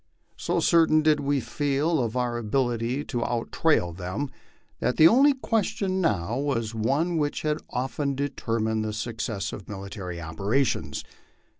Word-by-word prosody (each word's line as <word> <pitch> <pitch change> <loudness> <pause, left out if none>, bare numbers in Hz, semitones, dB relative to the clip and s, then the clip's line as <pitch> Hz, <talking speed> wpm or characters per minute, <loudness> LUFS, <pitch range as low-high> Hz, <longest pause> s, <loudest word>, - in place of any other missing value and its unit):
So - - -1
certain 160 -2 +4
did 155 -1 +4
we 140 0 +1
feel 145 +5 0
of 120 -1 -1
our 120 -1 0
ability 120 +2 0
to 120 -3 -2
out 120 -1 -2
trail 115 - +2
them, 95 +10 -4 0.5
that 125 - 0
the 160 - +9
only 275 +8 +5
question 200 -6 0
now 110 - 0
was 115 -6 -1
one 140 +10 0
which 145 -1 -1
has 155 0 0
often 135 +2 -2
determined 115 -5 -1
the 110 0 -3
suc 115 +1 -4
cess 105 -4 -3
of 100 - -9
military 95 -3 -6
operations. 100 - -1
125 Hz, 150 wpm, -26 LUFS, 110-150 Hz, 0.5 s, the